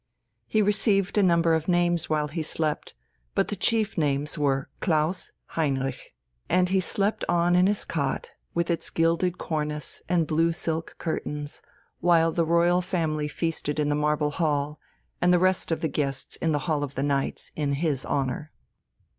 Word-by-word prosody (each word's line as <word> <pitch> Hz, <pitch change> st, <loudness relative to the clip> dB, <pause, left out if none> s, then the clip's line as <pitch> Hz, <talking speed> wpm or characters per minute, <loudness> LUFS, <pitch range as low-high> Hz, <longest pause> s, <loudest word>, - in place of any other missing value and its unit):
He 215 Hz, -1 st, +2 dB
received 200 Hz, -1 st, +2 dB
a 210 Hz, -, +4 dB
number 170 Hz, -3 st, +4 dB
of 160 Hz, 0 st, 0 dB
names 175 Hz, -2 st, +2 dB
while 150 Hz, -1 st, +1 dB
he 160 Hz, +3 st, -4 dB
slept; 155 Hz, 0 st, -2 dB, 0.4 s
but -, -, +2 dB
the -, -, -2 dB
chief 220 Hz, -1 st, +1 dB
names 145 Hz, 0 st, 0 dB
were 135 Hz, -3 st, 0 dB
Klaus 160 Hz, +1 st, 0 dB, 0.2 s
Heinrich. 135 Hz, -4 st, -2 dB, 0.3 s
And 180 Hz, 0 st, +3 dB
he 190 Hz, 0 st, +3 dB
slept 200 Hz, +4 st, 0 dB
on 175 Hz, 0 st, +3 dB
in 180 Hz, +1 st, +5 dB
his 205 Hz, 0 st, 0 dB
cot 140 Hz, -4 st, -2 dB, 0.2 s
with 170 Hz, 0 st, +1 dB
its 165 Hz, -, -2 dB
gilded 165 Hz, +2 st, +1 dB
cornice 150 Hz, -2 st, -3 dB
and 170 Hz, -2 st, +3 dB
blue 165 Hz, +2 st, +2 dB
silk 165 Hz, 0 st, -3 dB
curtains, 150 Hz, -3 st, -4 dB, 0.4 s
while 165 Hz, -1 st, +4 dB
the 165 Hz, 0 st, +1 dB
royal 170 Hz, +2 st, +3 dB
family 160 Hz, -5 st, -1 dB
feasted 155 Hz, -1 st, -2 dB
in 150 Hz, -1 st, +1 dB
the 145 Hz, -, +2 dB
Marble 150 Hz, 0 st, +1 dB
Hall, 150 Hz, -1 st, -1 dB, 0.4 s
and 180 Hz, -, +4 dB
the 180 Hz, -, +6 dB
rest 185 Hz, -1 st, +1 dB
of 165 Hz, -, 0 dB
the 160 Hz, -, +1 dB
guests 135 Hz, -2 st, -2 dB
in 165 Hz, -, 0 dB
the 145 Hz, -1 st, -1 dB
Hall 155 Hz, -4 st, 0 dB
of 140 Hz, -1 st, -5 dB
the 135 Hz, -, -1 dB
Knights, 140 Hz, -1 st, -1 dB
in 145 Hz, -2 st, 0 dB
his 140 Hz, -2 st, 0 dB
honour. 140 Hz, +2 st, -2 dB
160 Hz, 170 wpm, -26 LUFS, 150-175 Hz, 0.4 s, the